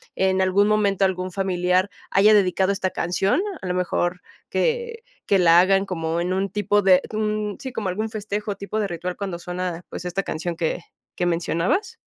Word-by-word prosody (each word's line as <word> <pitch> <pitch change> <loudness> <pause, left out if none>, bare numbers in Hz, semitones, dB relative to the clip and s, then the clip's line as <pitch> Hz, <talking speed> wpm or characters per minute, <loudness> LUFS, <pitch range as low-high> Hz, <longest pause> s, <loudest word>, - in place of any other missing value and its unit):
en 190 0 +2
algún 190 +2 +3
momento 200 -2 +2
algún 185 -1 -2
familiar 185 0 +1 0.2
haya 205 +3 +6
dedicado 190 -1 +3
esta 190 -1 -2
canción, 180 - 0 0.2
a - - -7
lo 180 - -1
mejor 180 0 -1 0.3
que 470 -1 -1 0.2
que 195 - +3
la 170 -1 +7
hagan 195 +1 +3
como 165 -3 -2
en 180 +2 -1
un 195 +1 -1
tipo 205 0 +1
de 185 -2 +5
un 210 -1 -1
sí, 260 - -6
como 220 -5 -3
algún 215 +5 -2
festejo 210 -1 -4
tipo 200 +2 -5
de 205 - 0
ritual 180 +1 -4
cuando 190 -3 -5
suena, 180 -1 -4
pues, - - -7
esta 180 +2 -1
canción 170 +1 -3
¿que 165 +1 -1 0.3
que 180 - -1
mencionabas? 175 - 0
190 Hz, 185 wpm, -23 LUFS, 180-205 Hz, 0.3 s, la